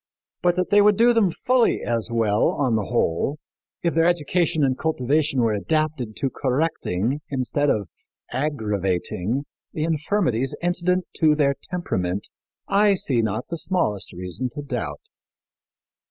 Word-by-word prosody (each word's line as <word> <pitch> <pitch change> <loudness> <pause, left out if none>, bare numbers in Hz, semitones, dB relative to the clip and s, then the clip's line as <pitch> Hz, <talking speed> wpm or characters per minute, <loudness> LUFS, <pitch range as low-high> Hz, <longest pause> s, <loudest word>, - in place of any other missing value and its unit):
But 175 0 +3
that 185 +2 -1
they 205 0 +7
would 205 -1 +5
do 240 +1 +5
them 225 -5 +3
fully 250 +7 +1
as 115 -1 -1
well, 110 -3 +2
on 130 -5 +1
the 105 -2 0
whole, 120 - 0 0.5
if 170 - +1
their 165 +1 +3
education 170 -1 +1
and 130 -2 +2
cultivation 145 -1 0
were 115 -2 +2
adapted 145 0 -1
to 135 - -1
correcting 130 - -1
instead 140 +2 0
of 105 -6 0 0.4
aggravating 110 - -1 0.3
the 155 - -2
infirmities 155 - 0
incident 180 +1 +1
to 155 -2 +4
their 140 -2 +3 0.2
temperament, 95 - -2 0.4
I 200 0 +4
see 130 -9 0
not 110 +2 -2
the 170 - -3
smallest 155 - -1
reason 90 +8 -4
to 145 - -5
doubt." 110 - -5
140 Hz, 140 wpm, -23 LUFS, 110-170 Hz, 0.5 s, they